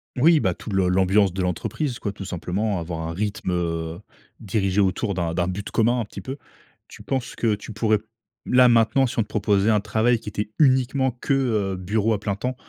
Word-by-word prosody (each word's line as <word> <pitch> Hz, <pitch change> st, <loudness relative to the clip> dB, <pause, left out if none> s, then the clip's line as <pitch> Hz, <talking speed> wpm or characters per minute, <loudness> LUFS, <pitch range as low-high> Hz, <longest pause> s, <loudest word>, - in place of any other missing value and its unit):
Oui, 155 Hz, +5 st, +5 dB
bah 95 Hz, -8 st, +1 dB
tout -, -, -8 dB
le 95 Hz, -2 st, +2 dB
l'ambiance 95 Hz, +2 st, +3 dB
de 95 Hz, -, -2 dB
l'entreprise 120 Hz, -, -2 dB
quoi 100 Hz, -, -3 dB
tout 100 Hz, -, -8 dB
simplement, 95 Hz, +3 st, -2 dB
avoir 85 Hz, -1 st, -5 dB
un 85 Hz, -, -4 dB
rythme, 100 Hz, 0 st, -3 dB
heu, 85 Hz, -1 st, -2 dB, 0.4 s
dirigé 100 Hz, -1 st, 0 dB
autour 100 Hz, +2 st, 0 dB
d'un 85 Hz, -2 st, -2 dB
d'un 85 Hz, -1 st, 0 dB
but 95 Hz, +2 st, -4 dB
commun 120 Hz, +2 st, +2 dB
un 115 Hz, -, -2 dB
petit 100 Hz, -, -9 dB
peu. 130 Hz, +9 st, -6 dB, 0.5 s
Tu -, -, -13 dB
penses 130 Hz, -3 st, -3 dB
que 115 Hz, -2 st, +1 dB
tu 105 Hz, +2 st, -7 dB
pourrais, 110 Hz, 0 st, +1 dB, 0.5 s
là 125 Hz, 0 st, +6 dB
maintenant, 120 Hz, +3 st, +4 dB
si 120 Hz, -, -3 dB
on -, -, +5 dB
te -, -, -16 dB
proposait 105 Hz, -1 st, +1 dB
un 105 Hz, -1 st, +4 dB
travail 110 Hz, +3 st, +1 dB
qui 105 Hz, -, -7 dB
était 105 Hz, 0 st, -4 dB
uniquement 130 Hz, -2 st, +3 dB
que, 125 Hz, +3 st, -2 dB
heu, 110 Hz, -8 st, 0 dB
bureau 105 Hz, +4 st, 0 dB
à 105 Hz, -, -1 dB
plein 100 Hz, -1 st, -2 dB
temps, 125 Hz, +5 st, -3 dB
105 Hz, 215 wpm, -23 LUFS, 95-120 Hz, 0.5 s, là